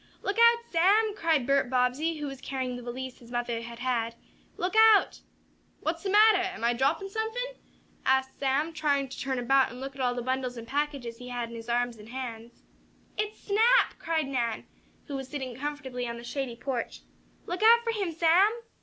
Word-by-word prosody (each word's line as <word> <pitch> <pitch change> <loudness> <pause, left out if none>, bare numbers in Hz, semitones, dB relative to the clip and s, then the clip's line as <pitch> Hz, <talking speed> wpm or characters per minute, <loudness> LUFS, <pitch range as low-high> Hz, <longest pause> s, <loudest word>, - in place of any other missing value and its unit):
"Look 400 +3 -1
out, 470 0 +6
Sam!" 405 +6 +4
called 325 - +1
Bert 275 -1 +2
Bobbsey, 260 +6 +1
who 295 - -4
was 275 -2 -7
carrying 260 -2 -3
the 245 - -7
valise 250 +1 -6
his 235 - -15
mother 240 -1 -2
had 235 0 -8
had. 235 -2 -1 0.4
"Look 365 +3 -2
out!" 440 -2 +5 0.6
"What's 325 +1 -2
de 395 - -3
mattah? 405 -3 +5
Am - - -9
I 235 +1 +3
droppin' 285 +10 0
suffin?" 450 +5 -3 0.5
asked 265 0 +1
Sam, 280 +4 0
trying 285 -3 0
to - - -8
turn 265 -1 -2
about 265 +2 +3
and 245 - -10
look 270 +1 -6
at 270 - -6
all 245 -1 +1
the 245 - -3
bundles 255 -1 -2
and 230 0 -8
packages 275 -4 -3
he 250 - -9
had 240 -1 -3
in - - -8
his 230 +1 -9
arms 240 0 0
and 210 +1 -13
hands. 235 -2 -7 0.5
"It's 425 0 -3
Snap!" 455 +5 +3
cried 320 -3 -1
Nan, 240 -5 -2 0.4
who 285 - -6
was 270 -1 -6
sitting 265 -3 -5
comfortably 265 -3 -4
on 235 0 -5
the 235 - -9
shady 250 0 -4
porch. 245 -1 -4 0.4
"Look 355 +2 -4
out 465 +2 +7
for 460 - 0
him, 400 -6 -2
Sam." 335 +5 +4
270 Hz, 200 wpm, -28 LUFS, 245-345 Hz, 0.6 s, out